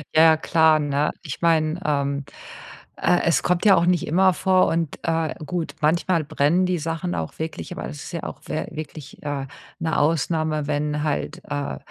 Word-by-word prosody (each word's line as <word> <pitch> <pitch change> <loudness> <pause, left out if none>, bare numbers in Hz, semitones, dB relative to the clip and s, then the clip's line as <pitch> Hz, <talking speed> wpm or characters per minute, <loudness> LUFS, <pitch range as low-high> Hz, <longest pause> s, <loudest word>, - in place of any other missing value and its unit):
Ja, 155 - +7
ja, 160 -1 +6
klar, 160 -1 +4
ne? 145 0 0
Ich 145 -6 -6
meine, 160 -1 +2
ähm, 140 -1 0 0.7
äh, 175 - +2
es 165 - +2
kommt 180 +3 +1
ja 200 -2 +8
auch 170 -1 +3
nicht 175 -2 +1
immer 185 +3 +4
vor 185 +1 +3
und, 165 -3 -1
äh, 165 -1 0
gut, 175 0 -3
manchmal 165 +2 +2
brennen 155 +4 +2
die 180 -1 0
Sachen 160 - -3
auch 80 -2 -4
wirklich, 160 - -5
aber - - -5
es 75 - -8
ist - - -8
ja - - -4
auch - - -7
wä - - -3
wirklich, 155 -2 -8
äh, 145 -2 -3 0.3
'ne 160 -1 -1
Ausnahme, 155 0 +1
wenn 150 0 -1
halt, 150 -2 -2
äh, 70 -1 -3
155 Hz, 185 wpm, -23 LUFS, 145-170 Hz, 0.7 s, ja